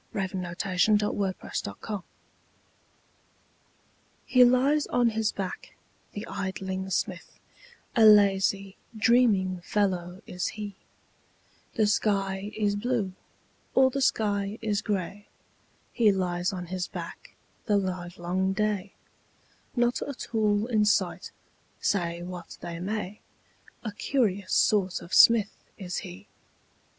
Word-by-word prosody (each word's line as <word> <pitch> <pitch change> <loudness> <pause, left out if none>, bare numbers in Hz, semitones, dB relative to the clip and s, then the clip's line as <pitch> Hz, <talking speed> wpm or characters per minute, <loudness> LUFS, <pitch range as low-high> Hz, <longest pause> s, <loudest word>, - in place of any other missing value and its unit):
Helen 190 -2 -2
Hunt 175 0 -7
Jackson 195 +3 +3
The 210 0 0
Poet's 195 -2 -2
Forge 190 - -6 2.2
HE 255 -1 +6
lies 270 +5 +3
on 240 -1 +2
his 220 -1 0
back, 190 -2 -6 0.4
the 205 +2 -5
idling 190 -1 -4
smith, 185 -1 -3 0.6
A 230 - +5
lazy, 195 -2 +5 0.2
dreaming 210 -6 +3
fellow 185 -3 -1
is 180 0 -3
he; 205 -1 -5 1.0
The 220 - +3
sky 200 -1 0
is 205 -1 +1
blue, 210 -3 -1 0.6
or 260 0 +5
the 275 - -2
sky 205 -4 +1
is 210 -2 -1
gray, 200 0 -3 0.7
He 225 -4 +4
lies 180 -2 -1
on 180 -2 -5
his 185 -1 -2
back - - -9 0.3
the 205 -2 +3
livelong 185 0 -2
day, 205 -1 -1 0.8
Not 240 0 +1
a 280 - -4
tool 215 -3 0
in 225 -3 +2
sight, 210 - +1 0.5
say 170 -3 -1
what 180 -1 -8
they 170 -1 -6
may, 210 +1 -4 0.6
A 215 - -3
curious 205 -4 -1
sort 195 -4 +3
of 170 - -11
smith 225 -3 +6 0.2
is 180 -3 -5
he. 95 +3 -7
200 Hz, 120 wpm, -27 LUFS, 185-215 Hz, 2.2 s, HE